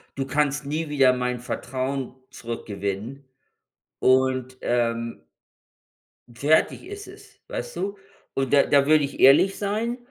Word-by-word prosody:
:„du 135 - -2
kannst 145 +1 0
nie 155 +2 -3
wieder 135 -3 +4
mein 125 -1 -2
Vertrauen 130 +2 -4 0.2
zurückgewinnen“, 115 +2 -5 0.8
und, 130 0 +2
ähm 115 -1 -1 1.2
fertig 150 - +2
ist 410 +1 -8
es, - - -15
weißt - - -6
du? 200 +1 -3 0.4
Und 135 -1 -1
da 140 - +6
da 140 -1 +3
würde 155 0 +4
ich 140 - -5
ehrlich 145 +9 +6
sein, 220 +4 -2
135 Hz, 125 wpm, -24 LUFS, 125-155 Hz, 1.2 s, da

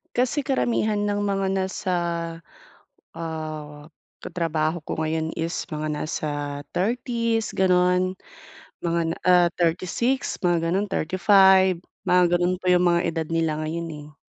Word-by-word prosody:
Kasi 255 +3 +1
karamihan 220 -5 +1
ng 205 0 0
mga 195 -1 0
nasa, 190 0 -2 1.2
ah, 155 -2 -6 0.4
katrabaho 160 -1 -1
ko - - -3
ngayon 160 0 -1
is 165 +1 -3
mga 155 0 -3
nasa 155 +1 -3 0.5
30's 230 +2 0
gano'n, 180 0 +3 0.7
mga 170 0 0
na - - -3
ah, 180 -1 +6
36, 185 +10 0
mga 170 -2 +1
gano'n, 200 +3 0
35, 190 +1 +4 0.3
mga 180 0 +5
gano'n 175 +1 +1
po - - -14
yung 180 0 +4
mga 170 0 +3
edad 160 -1 -3
nila 165 -2 0
ngayon, 165 +2 -3 0.2
eh. 150 - -19
180 Hz, 125 wpm, -24 LUFS, 165-195 Hz, 1.2 s, ah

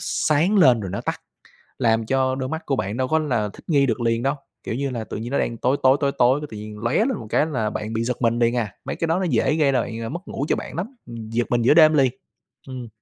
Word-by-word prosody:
sáng 165 +7 +1
lên 130 -10 +6
rồi 95 -3 -5
nó 100 - -3
tắt, - - -4 0.6
làm 115 -1 +2
cho 130 +2 +1
đôi 130 -1 -3
mắt 160 +2 -5
của 135 - 0
bạn 105 -2 -3
đâu 130 0 0
có 160 +3 +2
là 120 -9 -1
thích - - -14
nghi 140 -4 +4
được 120 -3 -1
liền 115 0 0
đâu. 135 +2 +1 0.3
Kiểu - - -3
như 140 +2 -2
là, 120 -3 -4
tự - - -6
nhiên 115 +3 -5
nó 140 - +1
đang 115 - -2
tối 130 +4 +1
tối, 130 +1 +5
tối 140 -1 +2
tối 125 +3 +4
cái 150 - -5
tự 110 - -7
nhiên 105 0 -8
lóe 115 +6 -1
lên 230 +4 +2
một 110 - -9
cái - - +2
là 125 -9 -1
bạn 105 +1 -5
bị 115 0 -1
giật 125 +1 -3
mình 115 0 +2
liền 120 0 +2
à, 110 -5 -2
mấy - - -3
cái 165 - -2
đó 165 +3 +1
nó 190 - -1
dễ 155 - +2
gây 150 -3 +3
ra 130 - +2
bạn 115 - -5
ờ, 115 0 -4
mất 170 - -5
ngủ 140 - -3
cho - - +3
bạn - - -7
lắm, 210 +11 -5
ừm, 115 -2 -8
giật 120 +1 0
mình 120 -1 +1
giữa 125 - +5
đêm 155 -1 +7
liền. 135 -4 +3 0.6
Ừm. 130 -2 -7
130 Hz, 300 wpm, -22 LUFS, 115-145 Hz, 0.6 s, đêm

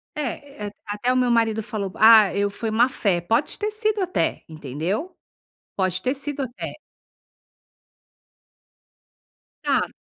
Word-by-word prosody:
É, 275 -5 -5
eh, - - -6 0.2
até 210 +4 -1
o - - -1
meu 250 -1 +2
marido 225 -1 +2
falou: 200 -4 -4
"Ah, 220 -2 +7
eu 200 0 +1
foi 220 +2 -4
má-fé", 220 -6 +2
pode 230 - 0
ter 425 0 -1
sido 430 -1 0
até, 365 0 -1
entendeu. 160 - -4 0.6
Pode 185 -1 0
ter 255 - 0
sido, 285 0 -3
até. 245 -1 -5 2.9
Ah. - - +3
Se - - -22
225 Hz, 130 wpm, -23 LUFS, 200-275 Hz, 2.9 s, Ah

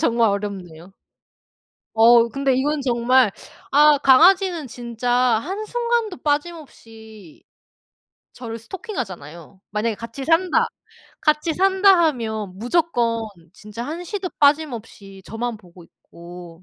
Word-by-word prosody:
정말 235 -6 +2
어렵네요. 190 -4 -6 1.0
어 230 +1 +5
근데 275 +1 -1
이건 290 +3 -1
정말 250 -2 +2 0.4
아 295 +1 +5
강아지는 340 +4 +4
진짜 240 0 -5
한순간도 415 - -1
빠짐없이 225 - -6 0.9
저를 230 -2 -7
스토킹하잖아요. 195 - -8
만약에 215 +2 -2
'같이 230 +4 -8
산다. 335 +4 +2 0.6
같이 305 +1 +1
산다.' 385 0 +4
하면 220 -7 -4
무조건 240 - 0 0.3
진짜 210 +2 -9
한시도 355 +4 -5
빠짐없이 235 -10 -1
저만 230 0 -5
보고 180 -3 -17
있고 170 +1 -14
240 Hz, 245 characters per minute, -21 LUFS, 215-315 Hz, 1.0 s, 어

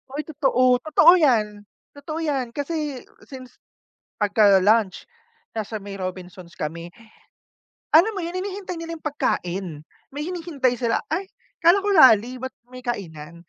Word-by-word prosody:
Ay 300 - -3
totoo, 255 -5 +2
totoo 310 +4 +5
'yan. 210 -8 +1 0.2
Totoo 310 +3 -7
'yan 265 -6 -2
kasi 290 -3 -4 0.2
since 255 -2 -12 0.6
pagka-lunch 205 -1 +3 0.5
nasa 220 0 -4
may 200 0 -9
Robinsons 185 -1 -7
kami. 165 +3 -5 1.0
Alam 340 +8 +6
mo - - -2
yun, 345 +2 -6
hinihintay 380 -1 -5
nila 330 0 -6
yung - - -25
pagkain. 180 - -3 0.3
May 290 +2 -5
hinihintay 325 -8 -1
sila. 235 -2 0
"Ay 365 +5 -3 0.3
akala 345 +3 +5
ko - - +1
rally, 250 -4 +6
ba't 260 0 -6
may 255 0 -11
kainan?" 170 - -6
255 Hz, 135 wpm, -23 LUFS, 200-310 Hz, 1.0 s, Alam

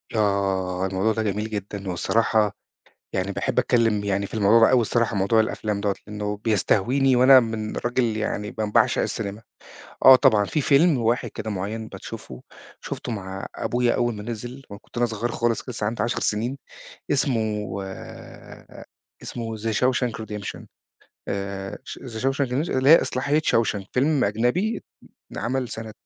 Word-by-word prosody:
آه، 95 -3 0
الموضوع 95 +4 0
ده 110 0 -1
جميل 105 +1 -2
جدًا 100 -2 -5
والصراحة 110 +3 +1 0.6
يعني 95 +2 -1
باحب - - -2
أتكلّم 115 -4 +2
يعني 100 0 0
في - - -11
الموضوع 110 +2 +5
ده - - +3
أوي 130 -2 +5
الصراحة، 115 -1 0
موضوع 100 +4 +3
الأفلام 105 -1 -2
دوّة، 100 -1 0
لإنه 105 0 -4
بيستهويني 120 +5 +2
وأنا 130 +1 +8
من 110 -2 -4
راجل 120 -2 0
يعني 105 -1 -2
ب - - -14
باعشق 105 -1 +2
السينما. 105 0 -4 0.6
آه 130 0 +11
طبعًا، 105 -4 +4
في 150 - -1
فيلم 145 +2 +4
واحد 120 +1 0
كده 110 - -5
معيّن 110 +3 -4
بتشوفه، 95 - -9 0.4
شُفته 120 - -5
مع 95 -2 -5
أبويا 120 0 0
أوّل 120 -1 0
ما 105 - -7
نزِل 120 +4 -6
وأنا 100 - -9
كنت - - -20
أنا 120 0 +2
صغيّر 115 +1 -3
خالص 120 +2 -1
لسه 110 -4 -3
عندي 115 +2 -2
10 120 - -1
سنين، 120 +6 -1 0.5
اسمه، 110 -8 0 1.5
اسمه 115 -2 -5
The - - -11
Shawshank 125 0 +1
Redemption 105 -2 -7 0.6
آآ 100 -1 -4
ش - - -8
The 115 -4 -7
Shawshank 135 +1 +1
Red 140 +7 -1
اللي 130 +1 +2
هي 165 - +9
إصلاحية 140 +4 0
Shawshank، 110 -7 +1
فيلم 140 +2 +2
أجنبي 125 - 0 0.5
انعمل 130 +1 -2
سنة 110 -1 -7
110 Hz, 155 wpm, -24 LUFS, 105-125 Hz, 1.5 s, آه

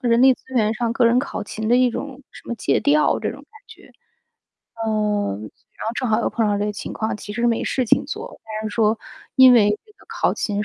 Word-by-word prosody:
人 235 0 +3
力 265 0 +7
资 - - -8
源 215 -3 +2
上 230 +1 -2
个 245 - +2
人 235 +1 +4
考 255 -4 -3
勤 215 +1 -5
的 240 - +5
一 250 -1 +4
种 275 +2 -6
什 - - -14
么 235 - -2
借 - - 0
调 300 +1 +3
这 - - -2
种 - - -9
感 440 -1 -19
觉。 - - -16 0.8
呃， 210 - -1
然 110 - -11
后 225 - -1
正 255 0 -2
好 220 +1 +2
又 - - -1
碰 225 -2 0
到 205 - +1
这 205 - -1
个 210 - -2
情 210 - -7
况， 220 - -2
其 205 - -8
实 235 +2 0
没 230 -1 +1
事 260 - 0
情 - - +3
做， 440 +11 -7
但 215 0 -5
是 - - -8
说， 220 -1 +2 0.4
因 260 -1 +9
为 210 -4 +5
这 430 - -22
个 - - -23
考 - - 0
勤 205 -1 -2
230 Hz, 265 characters per minute, -21 LUFS, 215-255 Hz, 0.8 s, 因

